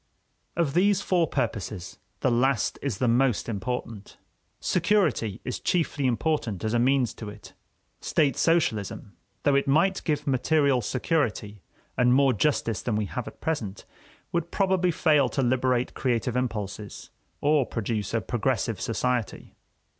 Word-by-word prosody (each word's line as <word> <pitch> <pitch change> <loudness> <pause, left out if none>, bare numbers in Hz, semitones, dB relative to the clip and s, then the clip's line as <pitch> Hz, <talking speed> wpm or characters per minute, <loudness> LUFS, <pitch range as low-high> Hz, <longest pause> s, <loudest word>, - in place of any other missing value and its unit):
Of 165 -5 0
these 200 +3 +3
four 175 -3 +2
purposes 100 -7 -3 0.2
the 130 - +2
last 125 -1 +1
is 135 -8 -2
the 125 - +1
most 125 0 +2
important. 110 -1 -5 0.4
Security 180 - +1
is 125 - -3
chiefly 160 -6 0
important 120 - -1
as 110 0 -1
a 120 - +3
means 130 0 +2
to 110 - -8
it. 105 0 -12 0.5
State 145 -3 +1
socialism, 140 - 0 0.3
though 145 - +3
it 140 0 +2
might 170 +8 +2
give 150 -2 -1
material 140 0 +2
security 110 - -1 0.4
and 125 0 +5
more 135 -1 +4
justice 115 -3 0
than 120 - -1
we 105 0 0
have 120 +4 -5
at - - -11
present, 110 -12 -3 0.5
would 170 0 -1
probably 190 -2 +1
fail 150 -6 +3
to 135 - -1
liberate 125 0 +1
creative 125 -1 -1
impulses 105 -5 -4 0.3
or 145 -1 +3
produce 110 -3 -3
a 115 - +1
progressive 115 -1 -1
society. 120 -1 -2
125 Hz, 140 wpm, -26 LUFS, 110-150 Hz, 0.5 s, and